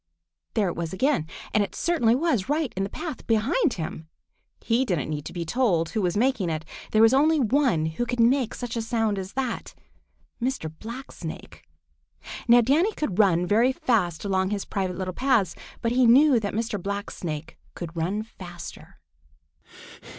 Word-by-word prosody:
There 210 -3 +2
it 175 - -2
was 170 0 -4
again, 255 - +1 0.3
and 210 - +4
it 200 - -6
certainly 285 -10 +2
was 265 - 0
right 300 -3 0
in 195 - -1
the 195 - -3
path 310 - -6
behind 250 - +2
him! 160 -1 -6 0.5
He 235 +2 +2
didn't 170 - -1
need 150 -1 -4
to - - -6
be 170 -1 -4
told 175 -5 +1
who 220 - -1
was 180 +1 0
making 225 -6 +1
it. 160 0 -3 0.3
There 215 +1 +5
was 225 +2 +6
only 305 +3 +4
one 250 - +2
who 160 +10 -2
could 245 0 -3
make 245 +1 +3
such 240 -2 -5
a 230 - -1
sound 225 -3 0
as 190 0 -7
that—Mr. 250 - -5
Blacksnake. 240 +5 -8 0.9
Now 240 0 +7
Danny 310 - +2
can 300 - -2
run 180 -3 +3
very 225 +7 +3
fast 205 -10 0
along 190 -1 +1
his 205 -1 -2
private 185 -3 -2
little 185 -1 -3
paths, 250 -5 +2 0.3
but 230 - +1
he 250 0 +4
knew 265 +1 +6
that 205 -2 -3
Mr. 220 -3 -2
Blacksnake 180 -6 -5 0.2
could 170 -1 -7
run 185 +6 -1
faster. 175 -5 -10
220 Hz, 170 wpm, -25 LUFS, 180-255 Hz, 0.9 s, Now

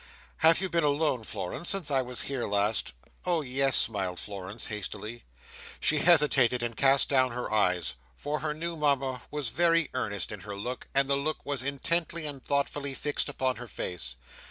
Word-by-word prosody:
"Have 160 +1 +5
you 190 - +1
been 170 -3 +1
alone, 145 -4 +1
Florence, 105 - -4
since 195 -7 0
I 135 -1 +3
was 125 -1 -1
here 135 -3 -3
last?" 100 - 0 0.3
"Oh 175 -3 +1
yes!" 135 -1 +3
smiled 95 -5 +2
Florence, 100 +2 -5
hastily. 105 +2 -5 0.5
She 150 - +3
hesitated 140 -7 +4
and 120 -1 -3
cast 135 +2 +4
down 130 -3 +2
her 125 -2 -4
eyes; 90 -5 +2 0.2
for 150 - -3
her 150 +1 -2
new 170 +2 -4
Mama 135 -4 0
was 150 -5 -3
very 170 +3 +2
earnest 100 -7 -2
in 105 - -6
her 100 +2 -7
look, 125 +6 -5
and 135 0 +3
the 140 - +2
look 150 +3 -3
was 140 -2 -1
intently 165 +4 0
and 140 -3 -5
thoughtfully 140 -1 -1
fixed 145 +2 -1
upon 130 -2 -1
her 120 - -8
face. 85 - -4
135 Hz, 180 wpm, -28 LUFS, 110-150 Hz, 0.5 s, Have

